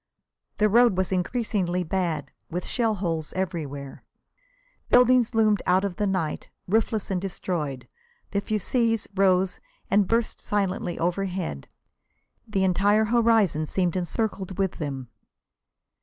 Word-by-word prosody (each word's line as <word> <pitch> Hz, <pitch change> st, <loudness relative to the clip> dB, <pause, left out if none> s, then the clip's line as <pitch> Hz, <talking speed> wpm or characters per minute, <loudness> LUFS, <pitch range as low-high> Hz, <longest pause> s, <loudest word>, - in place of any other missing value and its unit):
The 210 Hz, -, +4 dB
road 230 Hz, -2 st, +4 dB
was 190 Hz, 0 st, 0 dB
increasingly 185 Hz, -2 st, 0 dB
bad, 165 Hz, -5 st, -2 dB, 0.2 s
with 175 Hz, +2 st, -4 dB
shell 225 Hz, -3 st, 0 dB
holes 165 Hz, -5 st, -3 dB
everywhere. 150 Hz, -7 st, -4 dB, 0.9 s
Buildings 250 Hz, -1 st, +5 dB
loomed 215 Hz, -3 st, +3 dB
out 185 Hz, +2 st, +3 dB
of 185 Hz, -3 st, -4 dB
the 210 Hz, -1 st, 0 dB
night, 185 Hz, -5 st, -2 dB, 0.2 s
roofless 220 Hz, +1 st, 0 dB
and 180 Hz, -2 st, 0 dB
destroyed. 155 Hz, -9 st, -4 dB, 0.4 s
The 200 Hz, -, 0 dB
fusées 225 Hz, +2 st, 0 dB
rose 190 Hz, -1 st, +2 dB, 0.3 s
and 200 Hz, -1 st, +4 dB
burst 230 Hz, +2 st, 0 dB
silently 190 Hz, -3 st, -1 dB
overhead; 180 Hz, -, -2 dB, 0.8 s
the 200 Hz, -3 st, 0 dB
entire 200 Hz, +4 st, +3 dB
horizon 220 Hz, -8 st, +3 dB
seemed 180 Hz, 0 st, 0 dB
encircled 190 Hz, 0 st, -2 dB
with 190 Hz, -2 st, -1 dB
them. 135 Hz, -5 st, -4 dB
190 Hz, 120 wpm, -25 LUFS, 175-215 Hz, 0.9 s, Buildings